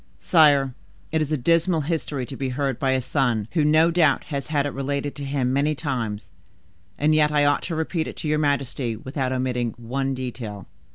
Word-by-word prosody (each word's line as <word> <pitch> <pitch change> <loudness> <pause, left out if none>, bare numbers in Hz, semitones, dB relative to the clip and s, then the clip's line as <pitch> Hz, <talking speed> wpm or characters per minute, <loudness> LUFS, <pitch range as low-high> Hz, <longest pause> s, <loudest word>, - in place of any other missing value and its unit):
"Sire, 145 -6 +4 0.4
it 160 -1 +1
is 155 0 -2
a 155 - +2
dismal 165 +4 +2
history 150 -4 -2
to 135 - -8
be 135 -1 -3
heard 135 -1 -2
by 135 - +1
a 130 - +1
son 120 -6 0
who 160 -3 +2
no 155 +3 +4
doubt 160 -4 +3
has 140 -3 -4
had 145 -2 0
it 145 - -3
related 140 +1 -2
to 145 - -7
him 135 -2 -1
many 145 +3 +1
times; 120 -9 -3 0.7
and 150 +2 +2
yet 150 -1 +4
I 145 -1 +3
ought 145 -1 +3
to 165 - -2
repeat 160 +1 -1
it - - -7
to - - -4
your 150 0 +1
majesty 140 -5 -1
without 130 +3 -3
omitting 125 -2 -1
one 135 +3 -2
detail." 115 -6 -6
140 Hz, 205 wpm, -24 LUFS, 130-150 Hz, 0.7 s, Sire